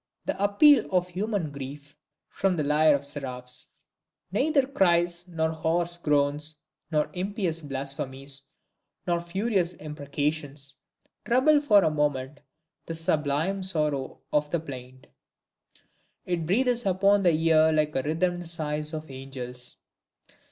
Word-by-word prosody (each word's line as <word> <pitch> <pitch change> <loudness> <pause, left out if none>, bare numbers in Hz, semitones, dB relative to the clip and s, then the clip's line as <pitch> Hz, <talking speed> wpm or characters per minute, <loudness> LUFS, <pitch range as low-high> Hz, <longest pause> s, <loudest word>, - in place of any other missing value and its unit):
The 195 - -2
appeal 230 +5 +5
of 180 -1 +1
human 190 -3 -2
grief 140 +1 -8 0.3
from 195 -2 0
the 155 - 0
lyre 150 +1 +4
of 140 - -3
seraphs! 125 -3 -6 0.6
Neither 275 +6 +2
cries, 175 -7 +1
nor 160 -2 -1
hoarse 170 +2 0
groans, 150 0 +1 0.3
nor 150 -2 0
impious 185 -3 -2
blasphemies, 135 -1 -4 0.6
nor 175 -1 +1
furious 185 +1 0
imprecations, 145 -2 -4 0.5
trouble 275 +5 +4
for 210 -9 +5
a 160 - +2
moment 145 -2 -1 0.5
the 165 - -3
sublime 160 +4 0
sorrow 150 -7 -1
of 150 0 +2
the 170 - 0
plaint: 130 -4 -10 1.2
it 170 -3 -2
breathes 245 +5 +2
upon 195 +2 +4
the 180 - +4
ear 160 0 +4
like 155 -1 +2
the 135 - +1
rhythmed 175 +4 -1
sighs 155 -1 -3
of 155 -2 -7
angels. 130 -2 -8
160 Hz, 125 wpm, -27 LUFS, 145-185 Hz, 1.2 s, appeal